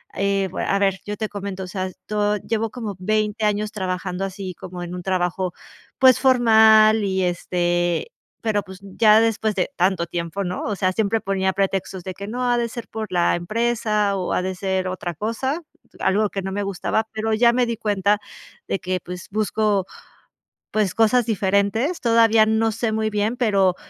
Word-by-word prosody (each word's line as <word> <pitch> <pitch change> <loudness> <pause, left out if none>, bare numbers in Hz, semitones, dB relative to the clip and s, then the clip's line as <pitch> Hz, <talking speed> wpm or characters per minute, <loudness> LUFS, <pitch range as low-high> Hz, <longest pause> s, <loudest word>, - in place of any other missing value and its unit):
eh, 195 -1 0 0.2
a 195 - +1
ver, 195 -1 +1
yo 210 0 -5
te 215 - -2
comento, 200 -2 -6
o - - -7
sea, 185 0 -3
estoy 210 +2 -2
llevo 225 0 0
como 215 -3 -6
20 215 +2 0
años 210 0 0
trabajando 185 -1 -3
así 195 -1 -5
como 180 +1 -8
en 175 +1 -6
un 180 - -5
trabajo, 180 -1 -1 0.5
pues 260 -2 +6
formal 220 -4 +6
y 190 -1 0
este 175 - 0 0.3
pero 215 -2 0
pues 190 -1 -11
ya 215 +2 +4
después 220 -2 0
de 185 +7 -1
tanto 185 -1 +1
tiempo, 170 +3 -4
¿no?, 180 0 -3
o 210 - -1
sea, 185 -1 +1
siempre 220 +3 0
ponía 190 -2 0
pretextos 190 -1 -2
de 185 - -5
que: 200 +2 -8
"No, 250 +3 -2
ha 240 0 +2
de 235 0 -1
ser 235 0 -7
por 220 -3 -6
la 175 -1 +2
empresa 210 +2 0
o 185 - -2
ha - - 0
de 190 0 -2
ser 190 0 -2
otra 180 -2 -4
cosa", 260 - -2 0.4
algo 210 +2 +2
que 195 -1 -4
no 190 - -4
me 205 +1 -2
gustaba, 200 +2 -1
pero 220 0 -2
ya 235 +2 +4
me 250 0 +2
di 235 -1 -2
cuenta 205 -1 +1 0.5
de - - 0
que, 185 -1 -2
pues 180 0 -9
busco, 210 -2 0 0.9
pues 205 -4 0
cosas 225 +2 +4
diferentes. 205 - 0
Todavía 230 -2 +4
no 220 +1 +2
sé 225 +1 -1
muy 220 0 -1
bien, 210 +3 -1
pero, 195 -7 +2
205 Hz, 185 wpm, -22 LUFS, 185-220 Hz, 0.9 s, pues